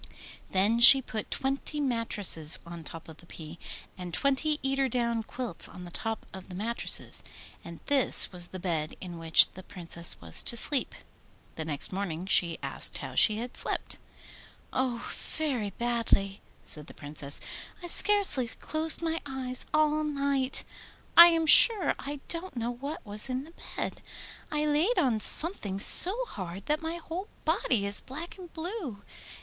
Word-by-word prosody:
Then 205 +5 +1
she 245 +3 +10
put 220 -4 -7
twenty 275 +3 -3
mattresses 215 - +1
on 170 -1 -10
top 165 +1 -9
of 160 -1 -13
the 170 - -18
pea, 160 0 -9 0.4
and 180 -1 -9
twenty 280 - -1
eider 270 0 0
down 235 -1 -2
quilts 235 -4 -5
on 180 - -12
the 175 - -12
top 225 +4 -5
of 190 0 -11
the 180 - -9
mattresses. 230 +5 -2 0.4
And 170 -1 -12
this 275 -3 +3
was 175 -2 -5
the 185 - -10
bed 165 -4 -4
in 175 -2 -9
which 165 -1 +5
the 185 - -12
Princess 170 -3 -3
was 80 -1 +3
to 235 - 0
sleep. 275 +3 +3 0.6
The 160 - -7
next 150 +3 0
morning 185 -3 -5
she 185 -2 +4
was - - -9
asked - - 0
how - - -8
she 215 -1 +4
had 240 +2 -7
slept. - - -3 0.7
'Oh, 250 -2 -3
very 265 -10 -4
badly!' 225 -3 -2 0.2
said 150 0 -1
the - - -14
Princess. 145 -1 -4 0.4
'I - - -6
scarcely 375 - +5
closed 315 +7 -1
my 325 0 -2
eyes 260 -2 -3
all 305 0 +1
night! 280 -3 -2 0.5
I 340 +1 +10
am 330 -1 +1
sure 415 +4 +7
I 285 0 -7
don't 340 -3 -2
know 235 +1 -3
what 275 +4 -8
was 210 +4 +1
in 255 +1 -3
the 325 +3 -16 0.2
bed. - - -5 0.5
I 300 0 -2
laid 305 +11 0
on 245 -6 +1
something 215 - +3
so 410 - +7
hard 190 - -9
that 300 +2 -2
my 325 +1 -5
whole 345 +4 -7 0.2
body 215 -6 0
is 200 0 0
black 320 +8 -9
and 355 -3 -12
blue. 320 - -7
240 Hz, 165 wpm, -27 LUFS, 185-300 Hz, 0.7 s, she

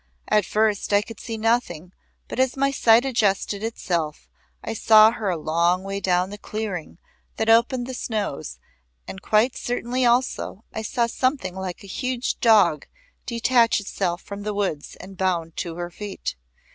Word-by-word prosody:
At 210 -3 +3
first 210 -1 +1
I 205 0 +4
could 225 -1 -11
see 225 -2 -5
nothing 215 -7 -1 0.3
but - - -6
as 260 0 +1
my 275 +1 +2
sight 235 -2 +4
adjusted 205 -5 0
itself 170 -9 -3 0.4
I 225 - -3
saw 220 0 +6
her 220 -4 -3
a 175 - 0
long 170 +4 +1
way 195 0 -4
down 185 0 +1
the 205 - -8
clearing 200 -8 -5 0.4
that 220 - -1
opened 240 +2 +3
the 260 - -6
snows, 205 - -4 0.5
and 190 - -8
quite 220 +6 +2
certainly 245 +1 -2
also 240 -3 0
I 220 - -3
saw 235 +2 0
something 255 -5 -1
like 190 -1 -6
a - - -11
huge 255 -1 -2
dog 205 -9 +4 0.4
detach 235 -1 +3
itself 190 -3 -3
from 200 0 -7
the 210 0 -3
woods 190 -8 -2
and 190 0 -12
bound 170 -4 -1
to 170 -2 -4
her 175 0 -5
feet. 200 - -6
210 Hz, 165 wpm, -23 LUFS, 185-235 Hz, 0.5 s, saw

